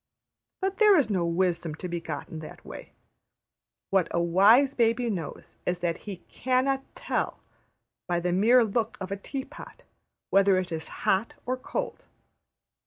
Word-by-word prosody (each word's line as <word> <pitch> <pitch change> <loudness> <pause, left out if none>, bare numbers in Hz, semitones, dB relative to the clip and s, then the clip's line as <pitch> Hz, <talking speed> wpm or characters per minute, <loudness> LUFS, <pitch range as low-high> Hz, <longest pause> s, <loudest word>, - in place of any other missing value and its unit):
But 385 0 -1
there 420 -3 +7
is 250 -8 +2
no 180 -4 +1
wisdom 170 -2 0
to 180 - -6
be 170 -1 -3
got 155 -3 -5
in 160 - -7
that 155 - -11
way. - - -10 1.0
What 190 -3 +3
a 170 - 0
wise 205 +11 +5
baby 235 -1 +2
knows 170 -7 -6
is 180 - -1
that 170 -1 0
he 190 -3 -7
\emph{cannot 260 +1 +1
tell}, - - -2 0.7
by 175 -1 +1
the 175 +1 -1
mere 230 +7 +5
look 225 +1 -1
of 190 0 -6
a - - 0
tea 265 +7 -5
pot, 295 - -12 0.5
whether 195 -1 +5
it 185 -1 -2
is 160 -1 -4 0.2
hot 195 +4 +1
or 255 - 0
cold. 275 - -5
195 Hz, 165 wpm, -27 LUFS, 175-255 Hz, 1.0 s, there